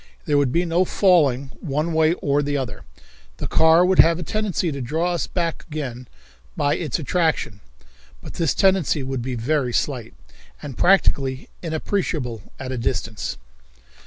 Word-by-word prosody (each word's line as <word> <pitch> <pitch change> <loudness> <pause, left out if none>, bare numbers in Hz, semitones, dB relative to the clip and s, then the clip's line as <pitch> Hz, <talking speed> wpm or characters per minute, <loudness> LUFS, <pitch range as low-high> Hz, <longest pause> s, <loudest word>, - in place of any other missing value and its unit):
There 145 - +1
would 140 -3 +1
be 170 +5 +1
no 170 +2 +2
falling 145 -9 +2
one 155 +2 -2
way 160 +1 +3
or 145 -2 0
the 145 0 -1
other. 105 - -5 0.5
The - - -4
car 160 +2 +5
would 185 0 +2
have 165 0 +6
a 175 - -5
tendency 200 -3 -1
to 140 -1 -5
draw 160 +8 -1
us 170 - -2
back 170 -3 -2
again 130 -6 -6 0.5
by 145 - +2
its 150 -8 -2
attraction, 160 - -1 0.6
but - - -10
this 165 -4 0
tendency 190 -7 +2
would 130 -1 -3
be 125 +1 -3
very 125 +1 0
slight, 125 -4 -2 0.4
and 140 -4 -8
practically 135 -8 +2
inappreciable 160 - -2 0.2
at 130 -1 -5
a 130 - -3
distance. 115 -2 -3
150 Hz, 160 wpm, -22 LUFS, 130-170 Hz, 0.6 s, have